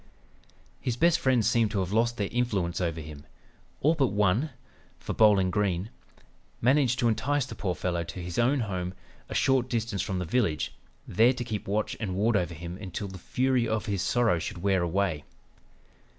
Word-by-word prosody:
"His 120 - -2
best 170 +4 +4
friends 130 -4 +2
seemed 115 -2 +3
to 100 - -1
have 95 0 -3
lost 115 +2 +1
their 100 - 0
influence 100 -8 -1
over 85 -2 -1
him,... 75 -1 -10 0.6
all 155 +4 +4
but 140 -5 +2
one; 105 +7 +1 0.5
for - - -5
Bowling 100 -4 +4
Green... 100 0 0 0.7
managed 130 0 +3
to 120 -1 +2
entice 140 +5 +1
the 130 - -8
poor 95 -4 -2
fellow 85 +1 -1
to 95 - -7
his 85 +2 -4
own 130 +3 +3
home, 95 -4 -3 0.3
a - - -5
short 130 -2 +2
distance 115 -5 -1
from 95 0 -2
the 90 - -2
village, 85 -5 0 0.3
there 120 +4 +4
to 125 - -4
keep 110 -3 -5
watch 105 +2 -1
and 100 -5 -3
ward 110 +4 +2
over 90 -3 0
him 85 +3 -7
until 100 +1 -5
the 95 0 -9
fury 130 +3 +1
of 110 -1 -1
his 100 -3 -1
sorrow 115 -4 +2
should 85 +2 -6
wear 95 -2 +2
away. 85 -3 0
105 Hz, 185 wpm, -28 LUFS, 90-120 Hz, 0.7 s, best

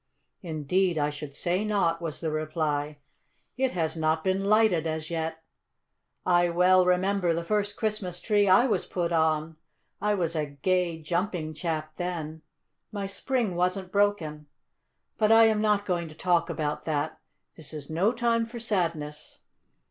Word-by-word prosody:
"Indeed 170 +2 0
I 145 0 +1
should 145 -1 -8
say 180 +6 0
not," 195 -6 +1
was 165 -3 -4
the 160 -2 -1
reply. 155 -1 -2 0.6
"It 260 0 0
has 165 -3 -1
not 160 0 0
been 190 +1 0
lighted 205 -6 +3
as 160 +1 -4
yet. 160 -1 -3 0.8
I 175 -1 +4
well 180 +1 +4
remember 180 -1 +2
the 170 - -2
first 205 +2 0
Christmas 210 -5 -2
tree 205 -2 +2
I 190 +7 +6
was 240 - 0
put 175 -2 -2
on. 160 -1 +1 0.4
I 210 0 +2
was 170 -4 -1
a 155 -2 -1
gay, 170 +4 0
jumping 170 -1 -2
chap 155 -1 -4
then. 160 -3 -4 0.5
My 200 -2 -3
spring 220 +1 -1
wasn't 180 +1 -1
broken. 175 -8 0 0.7
But 215 0 +4
I 225 0 +8
am 220 -1 +3
not 210 -1 +2
going 175 -3 -1
to 155 - -12
talk 175 0 +1
about 155 -3 -3
that. 155 0 -2 0.4
This 160 - -9
is 150 -1 -7
no 180 +8 +2
time 230 -1 +1
for 235 +1 -8
sadness. 165 -9 -3
175 Hz, 155 wpm, -27 LUFS, 155-200 Hz, 0.8 s, I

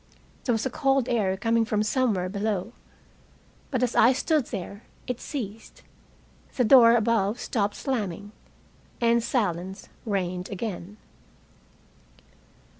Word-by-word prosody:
There 245 - +2
was 225 +2 -1
a 260 - -1
cold 270 -3 +1
air 200 -5 +1
coming 230 +2 +2
from 215 -1 0
somewhere 215 -6 +1
below. 205 +2 -2 1.0
But 255 -3 0
as 250 - 0
I 240 +4 +6
stood 290 0 +1
there 200 0 -6 0.2
it 250 -2 -4
ceased. 225 -7 -7 0.7
The 250 - +2
door 235 0 +7
above 225 -1 +1
stopped 205 -3 -1
slamming, 205 - -3 0.7
and 235 0 +3
silence 190 -6 -2
reigned 185 -4 -2
again. 200 -1 -5
220 Hz, 115 wpm, -26 LUFS, 200-245 Hz, 1.0 s, door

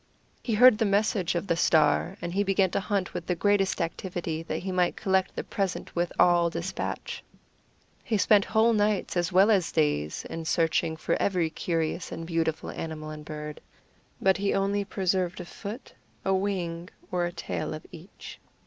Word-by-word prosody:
He 230 - -1
heard 245 0 +7
the 225 - +3
message 200 -3 +1
of 170 - -1
the 170 - +1
Star, 165 +3 +3
and 170 - -3
he 200 - +1
began 195 -2 +2
to - - 0
hunt 195 -2 -2
with 175 - -5
the 180 - +1
greatest 200 +1 +2
activity, 170 -1 -3
that 165 - -4
he 190 - -4
might 180 -1 +1
collect 190 -2 0
the - - -3
present 195 -3 -3
with 175 0 0
all 175 -1 +5
despatch. 170 +3 -4 0.8
He 220 - 0
spent 205 0 +5
whole 225 +1 +3
nights, 210 -3 +1
as 175 -1 0
well 195 +4 +5
as 190 -6 +2
days, 145 - 0
in 165 0 -6
searching 160 -1 +1
for - - -1
every 175 -5 +1
curious 165 0 -2
and 165 - -5
beautiful 165 -2 -1
animal 155 -1 -6
and 155 0 -8
bird. 150 0 -7 0.6
But 190 -1 +3
he 200 0 0
only 200 +1 +1
preserved 185 -2 -1
a 180 - -6
foot, 210 +7 -8 0.3
a 195 - +2
wing, 180 -3 -2 0.2
or 175 -1 +1
a - - -5
tail 170 -2 -4
of 155 - -10
each. 170 +3 -11
180 Hz, 180 wpm, -27 LUFS, 165-200 Hz, 0.8 s, heard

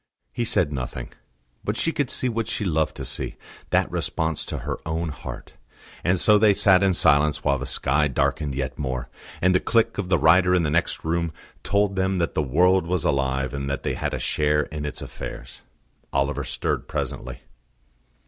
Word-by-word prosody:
He 120 - -1
said 85 -8 +1
nothing; 60 -2 -5 0.5
but 105 +3 -2
she 165 - +1
could 145 -5 -1
see 130 - -1
what 115 -2 -1
she 105 - -2
loved 80 -3 0
to - - -5
see, - - -4 0.3
that - - +2
response 80 -1 -1
to - - -4
her - - -4
own 80 +1 -2
heart; 75 - -8 0.5
and 90 +1 +2
so 105 +2 +5
they 105 -2 +5
sat 95 -2 +5
in 95 -2 +3
silence 75 0 +3
while 70 -1 +2
the 70 - -4
sky 75 +3 +1
darkened 70 +1 0
yet 65 -1 -3
more, 65 -3 -3 0.3
and 90 0 +5
the 90 - +4
click 115 0 +1
of 90 -3 -3
the 90 - +4
writer 90 +4 +5
in 90 - +2
the 75 - 0
next 85 +2 0
room 85 0 0 0.3
told 100 -1 +1
them 95 0 +1
that 85 -2 0
the - - +1
world 90 +6 +3
was 90 -2 0
alive 65 -4 0
and 70 0 -3
that 70 - -3
they - - -1
had - - -2
a - - -4
share 75 0 +1
in 75 0 -6
its 75 - -4
affairs. 60 0 -8 0.5
Oliver 70 +1 0
stirred - - -2
presently. - - -4
80 Hz, 195 wpm, -24 LUFS, 70-95 Hz, 0.5 s, so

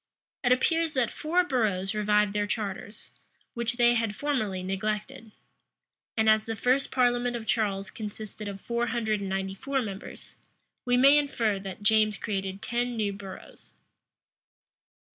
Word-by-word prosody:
It 245 - +3
appears 325 +4 +2
that 255 -3 +1
four 345 +4 +1
boroughs 215 - 0
revived 210 -1 +2
their 205 0 0
charters, 205 0 -5 0.4
which 235 -1 -1
they 240 0 +4
had 225 -3 0
formerly 215 -11 -1
neglected. 210 +3 -3 0.9
And 220 0 +3
as 215 0 +5
the 225 - -3
first 255 +5 +1
parliament 245 -1 +2
of 230 -2 -5
Charles 200 -4 0
consisted 215 0 -7
of 200 -1 -6
four 235 +3 -1
hundred 220 -4 0
and 195 -1 -4
ninety 195 0 -2
four 275 +7 -2
members, 195 -2 -9 0.5
we 245 0 +3
may 275 +3 +7
infer 230 -8 0
that 195 +1 -8
James 215 -1 +3
created 195 -2 -3
ten 240 0 -1
new 205 -2 0
boroughs. 195 -1 -11
220 Hz, 145 wpm, -28 LUFS, 200-245 Hz, 0.9 s, may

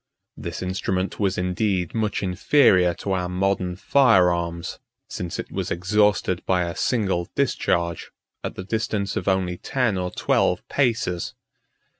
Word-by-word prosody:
44 - - -5
This - - -6
instrument 95 0 -2
was 100 -2 +1
indeed 90 0 0
much 110 -3 -1
inferior 90 - +4
to 100 - -4
our 90 -2 0
modern 90 -1 0
fire 95 -4 +4
arms; 85 0 -4 0.3
since 90 -1 -5
it - - -6
was - - -3
exhausted 95 0 +1
by 90 -1 +2
a 85 0 -4
single 95 -8 0
discharge, 85 -1 0 0.3
at - - -4
the 95 - -6
distance 105 -1 -2
of - - -3
only 95 -2 +1
ten 115 -6 0
or 90 0 -2
twelve - - +1
paces. 115 -10 0
95 Hz, 145 wpm, -23 LUFS, 90-105 Hz, 0.3 s, inferior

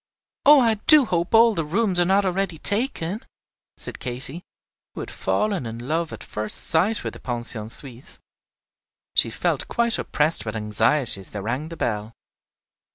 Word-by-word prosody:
"Oh, 295 0 +9
I 230 -3 +3
do 305 -4 +8
hope 175 -1 -1
all 230 0 +6
the 165 - -2
rooms 185 +4 +1
are 175 - +4
not 195 +2 +2
already 185 -2 -1
taken," 205 - -1 0.6
said - - -8
Katy, 130 +6 -4 0.5
who - - -5
had - - -7
fallen 200 - -1
in 115 0 -7
love 155 +7 -3
at - - -9
first 105 0 -3
sight 195 +7 +1
with - - -5
the - - -11
Pension 120 -3 -3
Suisse. 125 +1 -7 1.0
She - - +5
felt - - -2
quite 235 -1 0
oppressed 150 +2 0
with 110 0 -5
anxiety 110 +3 +3
as 95 - -5
they 105 - -6
rang 125 +10 -4
the 165 - -9
bell. 105 0 -3
160 Hz, 165 wpm, -23 LUFS, -, 1.0 s, Oh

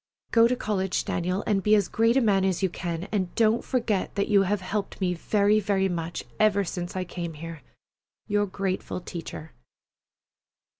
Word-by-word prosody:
Go 230 0 +6
to 250 - +1
college, 190 -5 -1
Daniel, 180 +3 -1
and 200 -2 +1
be 210 +2 +4
as 205 -3 +2
great 230 +3 +2
a - - +4
man 200 -4 +3
as 190 0 0
you 190 - +3
can, 170 -1 -4
and 190 -4 -1
don't 225 +1 +3
forget 225 -6 -1
that 200 - 0
you 205 -2 +5
have 195 +1 0
helped 200 +2 -3
me 185 -2 +1
very, 205 +4 +2
very 195 -1 +1
much 170 -2 -3 0.2
ever 205 -2 +4
since 175 -1 -5
I 185 - -1
came 175 -2 -5
here. 165 0 -8 0.7
YOUR 205 0 +1
GRATEFUL 190 -1 -3
TEACHER. 165 -2 -7
195 Hz, 180 wpm, -26 LUFS, 180-210 Hz, 0.7 s, Go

